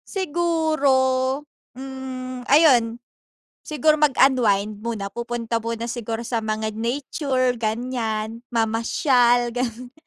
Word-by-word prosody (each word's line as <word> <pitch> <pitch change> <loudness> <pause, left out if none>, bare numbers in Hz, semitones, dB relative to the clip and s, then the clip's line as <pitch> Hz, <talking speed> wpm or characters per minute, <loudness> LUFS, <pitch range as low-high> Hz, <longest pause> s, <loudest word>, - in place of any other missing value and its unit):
Siguro, 295 -6 +1 0.3
hmm, 255 -1 -7
ayun 255 -6 +5 0.7
siguro 305 +1 +1
mag-unwind 225 -8 +3
muna, 215 -4 -4
pupunta 235 -1 -3
muna 230 0 -4
siguro 235 -1 -4
sa 230 -1 -1
mga 215 0 -2
nature 255 0 -1
ganiyan, 225 -1 -2
mamasyal 240 +1 +2
gano'n, 245 0 -4
245 Hz, 90 wpm, -22 LUFS, 230-265 Hz, 0.7 s, ayun